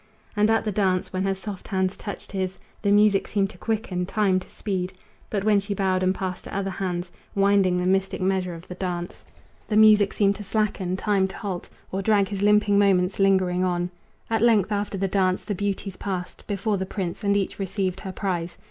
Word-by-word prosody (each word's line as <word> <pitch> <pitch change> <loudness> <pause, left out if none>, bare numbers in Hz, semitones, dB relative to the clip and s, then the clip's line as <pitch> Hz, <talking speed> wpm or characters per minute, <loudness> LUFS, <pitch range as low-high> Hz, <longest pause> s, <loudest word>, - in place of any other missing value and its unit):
And 210 +1 +3
at 225 0 +2
the 210 - 0
dance, 190 -3 0
when 185 - -1
her 195 0 +1
soft 190 0 -7
hands 190 -1 0
touched 205 - -7
his 190 -1 -2 0.2
The 205 - +1
music 205 -1 +4
seemed 195 -2 0
to 180 - -17
quicken, 205 -5 -2
time 195 -3 +2
to 185 - -13
speed; 190 -3 -3 0.4
But 200 -2 -1
when 210 -1 +4
she 200 +1 -3
bowed 185 -1 +1
and 185 0 +2
passed 185 -1 -4
to - - -7
other 195 -1 -1
hands, 180 -2 -3 0.2
Winding 195 -2 +3
the 180 - 0
mystic 190 +1 +1
measure 185 -2 0
of 165 +2 -12
the - - -6
dance, 180 -1 -4 0.4
The 215 - +1
music 215 -2 +6
seemed 200 -1 +2
to 210 - -7
slacken, 195 -3 -1
time 195 -1 +2
to 190 - -9
halt, 190 -5 -5 0.2
Or 195 - -1
drag 200 -1 +3
his 200 -2 -4
limping 205 0 +4
moments 190 -2 +3
lingering 190 -2 +3
on. 175 -1 0 0.4
At 225 -1 0
length, 220 -4 +4
after 205 -1 -1
the 195 +1 0
dance, 185 -1 +1
the 210 - -3
beauties 195 -1 -3
passed 185 -3 -5
Before 205 +1 0
the 190 - -3
prince, 185 0 -4
and 200 0 +3
each 195 0 -2
received 190 -1 -2
her 190 - -6
prize. 175 -3 -3
195 Hz, 210 wpm, -25 LUFS, 185-205 Hz, 0.4 s, music